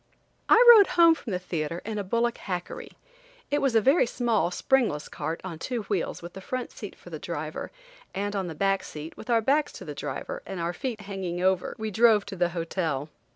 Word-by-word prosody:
I 485 - +7
rode 410 -3 +7
home 335 -1 +8
from 315 - -8
the 180 - 0
theatre 170 -2 -3
in 215 -1 -3
a - - -2
bullock 235 +4 0
hackery. 180 -3 -5 0.6
It 290 - +2
was 270 -4 +1
a 225 - +6
very 270 +3 +4
small 235 -6 +1
springless 195 - +1
cart 160 +3 -4
on 170 -4 -6
two 240 +3 -3
wheels 195 -4 -2
with 175 - -9
a 190 - -8
front 255 +5 -4
seat 205 - -9
for 175 - -15
the 155 - -5
driver, 155 -2 -5 0.4
and 205 +1 -3
on 190 -2 -1
the 160 - -6
back 195 +3 +1
seat, 155 +2 -8
with - - -11
our 230 -1 +4
backs 285 +6 +2
to - - -9
the - - -6
driver - - -5
and 190 - -6
out 170 +1 -2
feet 235 -2 -4
hanging 190 -3 -4
over, 185 -1 +1
we 220 0 -4
drove 220 -1 +4
to - - -7
the 175 -1 +1
hotel. 165 -4 -2
195 Hz, 215 wpm, -27 LUFS, 175-235 Hz, 0.6 s, home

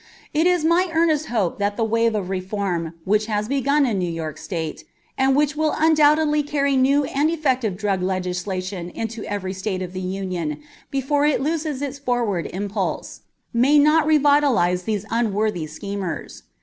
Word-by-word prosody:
It 315 +3 +3
is 355 -3 +2
my 350 +3 +3
earnest 320 -2 +2
hope 210 -8 -1
that 205 0 -1
the 230 - +1
wave 230 0 +1
of 190 -3 -3
reform 185 -3 -2
which 210 +2 +2
has 210 -1 -1
begun 280 +2 +2
in 220 -6 0
New 180 -1 -1
York 160 -2 -5
State, 160 -5 -5 0.3
and 265 0 +2
which 295 0 +2
undoubtedly 305 -1 +3
will 290 - -9
carry 280 -2 +1
new 275 +2 +3
and 285 +3 +1
effective 260 - 0
drug 200 -2 -1
legislation 185 0 -3
into 225 +4 -5
every 195 -2 -3
State 190 -1 -3
of 180 0 -7
the 185 - -4
Union 185 -4 -3 0.3
before 285 +1 +1
it 300 - +2
loses 300 -1 -2
its 280 0 -4
forward 240 -9 -1
impulse, 200 +1 -4 0.3
may 260 +6 +4
not 305 +1 +4
revitalize 285 - +3
these 210 -2 -2
unworthy 215 -6 0
schemers. 190 +1 -6
225 Hz, 160 wpm, -22 LUFS, 190-290 Hz, 0.3 s, may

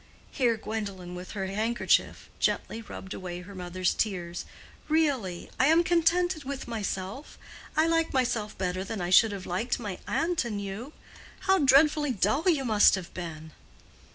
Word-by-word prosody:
Here 240 -5 +2
Gwendolen 200 -5 -5
with 180 +1 -8
her 195 -2 -3
handkerchief 220 +5 0
gently 225 - 0
rubbed 190 -3 -8
away 180 -1 -6
her 190 +3 -11
mother's 185 0 -1
tears. 175 -5 -2 0.4
"Really—I 270 - +1
am 325 +2 +5
contented 345 -1 +2
with 275 0 -5
myself. 210 +2 -4 0.4
I 315 - +5
like 330 0 +1
myself 240 -5 0
better 185 0 -2
than 210 +2 -5
I 175 0 -2
should 220 +3 +7
have 195 -2 -6
liked 225 +9 -1
my 205 -6 -5
aunt 335 -1 +1
and 215 -4 -3
you. 200 +8 -6 0.5
How 385 0 +3
dreadfully 295 +1 +4
dull 220 - +2
you 290 -6 +2
must 215 -4 +5
have 185 -3 -7
been!" 160 -3 -7
220 Hz, 155 wpm, -28 LUFS, 185-280 Hz, 0.5 s, should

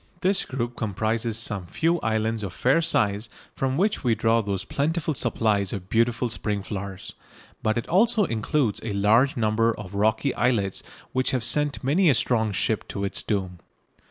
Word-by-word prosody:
This 190 +1 +2
group 120 -2 -4
comprises 110 +1 -1
some 105 -5 -2
few 165 - 0
islands 110 -1 -1
of 100 -4 -5
fair 135 - +2
size 105 -7 0 0.3
from 135 0 -1
which 200 +4 +1
we 120 -3 +2
draw 115 +1 +2
those 100 -2 -3
plentiful 155 +2 -1
supplies 110 -6 0
of 95 -2 -6
beautiful 115 +2 +1
spring 105 -3 -2
flowers, 100 -2 -6 0.5
but 110 +1 0
it 120 - -3
also 215 +3 +3
includes 115 - 0
a 110 -2 -4
large 110 +8 +3
number 115 0 +1
of 100 -1 -8
rocky 110 +6 +1
islets 110 -6 0 0.3
which 130 0 0
have 130 -3 0
sent 145 +3 +1
many 160 +7 +3
a 135 - +4
strong 115 -2 +1
ship 105 +2 -1
to 100 - -4
its 100 - -1
doom. 95 -4 -3
115 Hz, 170 wpm, -25 LUFS, 105-130 Hz, 0.5 s, a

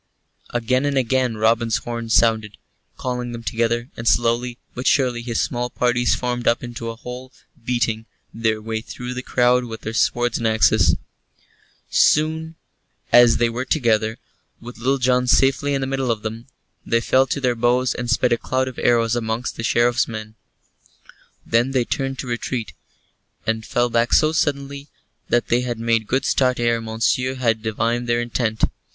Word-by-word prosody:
Again 125 +2 0
and 140 -1 0
again 130 -2 +1
Robin's 115 +1 +2
horn 115 -1 -5
sounded, 110 -2 +2 0.4
calling 125 -1 -3
them 115 0 -7
together, 115 +3 -1
and 115 - -5
slowly 120 +1 +1 0.2
but 125 - -4
surely 125 -4 +2
his 120 -1 -2
small 120 0 -1
parties 120 0 +1
formed 120 -1 -3
up 115 - +2
into 120 -1 -6
a 115 - -6
whole, 125 +2 -9 0.3
beating 115 -2 -1 0.3
their 110 -1 0
way 110 0 -3
through 125 +2 -7
the 125 - -4
crowd 125 -1 +2
with 115 -1 -8
their 110 - -5
swords 120 +1 +1
and 115 - 0
axes. 110 -3 +3 1.0
So - - +5
soon 160 +1 -3 0.6
as 120 -1 +7
they 120 - +2
were 120 +2 -3
together, 115 -5 +1 0.4
with 120 0 -11
Little 135 +4 +1
John 125 -1 +2
safely 135 +2 +3
in 135 - -1
the - - -1
middle 135 -1 -2
of 110 -2 -1
them, 115 +2 -6 0.4
they 115 - +1
fell 130 +3 +2
to 140 - -2
their 125 -2 +1
bows 120 +2 +1
and 125 -1 -5
sped 120 0 +2
a 120 - 0
cloud 130 0 -1
of 130 - -7
arrows 115 -1 +2
amongst 115 +1 -2
the - - -5
Sheriff's 120 +2 +2
men. 110 -1 -7 1.1
Then 120 +4 +1
they 125 -3 +1
turned 135 +1 -2
to - - -5
retreat, 120 -1 -3 0.7
and 110 0 -1
fell 120 +2 0
back 115 +1 +1
so 155 0 +5
suddenly 140 -2 -2 0.4
that 120 -1 +1
they 120 +1 +3
had 120 -2 -3
made 115 -1 0
good 130 +2 0
start 130 -2 +2
ere 115 -1 +1
Monceux 115 +3 0
had 115 -3 +1
divined 115 +2 -1
their 120 0 +2
intent. 115 -2 -2
120 Hz, 175 wpm, -21 LUFS, 115-125 Hz, 1.1 s, as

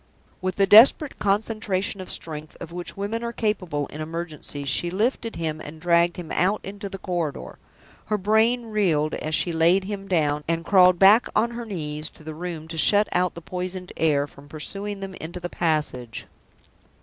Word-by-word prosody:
With 185 0 -2
the 200 - +4
desperate 235 +8 +6
concentration 205 -1 -1
of 185 - -9
strength 155 -1 -6
of 170 -1 -8
which 175 +2 -7
women 215 +4 -3
are 235 - -2
capable 185 -11 -1
in 155 - -7
emergencies, 155 -3 -5
she 170 +6 0
lifted 225 +4 -1
him 155 -2 -3
and 155 +2 -9
dragged 170 +1 +3
him 175 -3 -7
out 195 +4 +2
into 200 +1 -7
the 195 - -6
corridor. 175 -6 -4 0.5
Her 210 - 0
brain 220 +4 +2
reeled 175 -9 +1
as 155 +1 -2
she 175 - +1
laid 170 +4 +4
him 195 0 -6
down, 150 -5 +1
and 165 0 -1
crawled 185 -2 +6
back 200 +6 +6
on 230 +2 +2
her 235 0 -6
knees 155 -5 -4
to - - -16
the 155 0 -6
room 165 -1 -6
to 165 -1 -4
shut 205 +5 +5
out 180 0 +1
the 170 - -8
poisoned 180 +1 -5
air 145 -3 +2
from 145 0 -16
pursuing 195 +7 -5
them 195 -1 -6
into 170 +3 -6
the 175 0 -5
passage. 150 -10 -2
180 Hz, 185 wpm, -24 LUFS, 160-205 Hz, 0.5 s, desperate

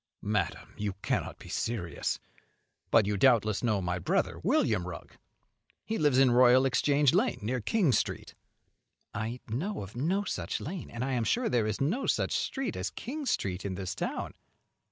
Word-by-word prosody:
"Madam! 100 -5 -2
you 105 -2 -1
cannot - - -1
be - - -13
serious. 100 -8 -2 0.7
But 110 - +5
you 105 0 0
doubtless 110 -3 +3
know 105 -5 +1
my 90 0 -1
brother, - - 0
William 90 - +2
Rugg. 90 - -8 0.7
He 225 - -2
lives 145 -4 +3
in 135 -2 +6
Royal 125 +1 +6
Exchange 140 +1 +3
Lane, 210 +9 +2
near 125 +3 -1
King 175 - +2
Street." - - -1 0.8
"I 110 +4 -4
know 150 - -3
of 100 +4 -11
no 175 +11 0
such - - -3
lane; 175 +2 -6
and 120 +1 -4
I - - -2
I - - -1
am 120 -2 +1
sure 240 - +1
there 115 -3 +2
is 105 - -2
no 190 - 0
such - - +1
street 270 -2 -2
as - - -2
King 285 +4 -6
Street 95 - -1
in 95 -2 -3
this 95 0 -4
town." - - -3
120 Hz, 175 wpm, -30 LUFS, 105-150 Hz, 0.8 s, in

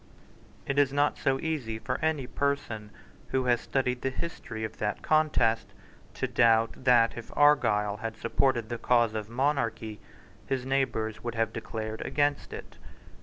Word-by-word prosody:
It 140 +1 0
is 140 -2 +4
not 145 +1 +1
easy 135 -4 0
for 125 +5 -4
any 155 -4 +1
person 135 -6 -2 0.4
who 130 -1 0
has 120 -1 +3
studied 125 -2 -1
the 135 - 0
history 130 -6 -5
of 110 - -5
that 105 -1 -2
contest 135 -8 +2 0.5
to - - -1
doubt 115 +1 +3
that, 120 -2 +5
if 120 - -8
Argyle 105 -9 +4
had 110 +1 -5
supported 120 -1 +1
the 120 -1 -4
cause 120 -3 +3
of 110 -1 -4
monarchy, 120 -5 -1 0.5
his 130 -2 -1
neighbours 130 -5 -1
would 120 -1 -4
have 115 0 0
declared 110 0 -5
against 145 0 0
it. - - -9
120 Hz, 150 wpm, -28 LUFS, 110-140 Hz, 0.5 s, that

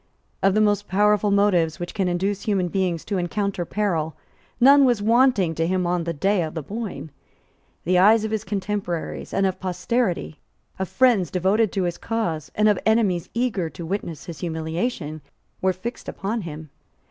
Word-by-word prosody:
Of 195 0 +3
the 215 - +4
most 205 -1 +2
powerful 210 +2 +3
motives 195 -5 +2
which 175 0 -5
can 195 -4 0
induce 190 +3 -1
human 190 -4 0
beings 180 -3 -1
to 195 -2 -1
encounter 185 +1 -2
peril 170 -6 -1 0.4
none 280 +3 +7
was 245 -4 +3
wanting 225 -5 +3
to 165 +1 -1
him 185 0 0
on 175 -1 0
the 170 - -1
day 190 +5 +1
of 160 -1 -4
the 160 - -3
Boyne. 205 -4 -6 0.7
The 180 +1 +3
eyes 215 +3 +6
of 220 - -3
his 220 -2 -1
contemporaries 195 -3 -3
and 195 - +1
of 190 -1 -1
posterity, 185 -2 -1 0.4
of 190 - -2
friends 235 - +3
devoted 190 +4 +1
to 195 - 0
his 175 -1 -2
cause 175 -10 -3
and 215 0 +3
of 210 -3 +3
enemies 210 -6 +2
eager 225 -9 0
to 170 - -8
witness 165 -5 -4
his 165 -3 -8
humiliation, 160 0 -3 0.4
were 190 - +3
fixed 230 +7 -6
upon 215 +4 -3
him. 155 -3 -8
190 Hz, 175 wpm, -23 LUFS, 170-210 Hz, 0.7 s, none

